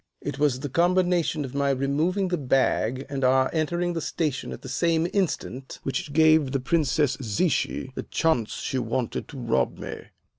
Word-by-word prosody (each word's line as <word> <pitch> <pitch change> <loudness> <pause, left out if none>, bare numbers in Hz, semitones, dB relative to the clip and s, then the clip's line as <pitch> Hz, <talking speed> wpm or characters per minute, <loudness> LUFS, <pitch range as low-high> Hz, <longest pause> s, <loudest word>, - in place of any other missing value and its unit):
It 145 -1 -5
was 140 -4 +2
the 145 - -3
combination 175 0 +2
of 125 - -8
my 140 0 +1
removing 150 +8 +1
the 175 - 0
bag 130 -1 +1
and 140 -1 -4
our 130 +1 +3
entering 175 +2 0
the 165 - -2
station 150 -3 -2
at - - -8
the - - -7
same 165 +4 +1
instant 145 -9 -2
which 135 +2 -3
gave 155 -2 +4
the 135 - +1
Princess 145 -1 +1
Zichy 130 - 0
the - - -4
chance 140 -10 0
she 130 - -2
wanted 120 0 -2
to 140 - -10
rob 115 -3 0
me. - - -7
140 Hz, 175 wpm, -25 LUFS, 130-165 Hz, -, gave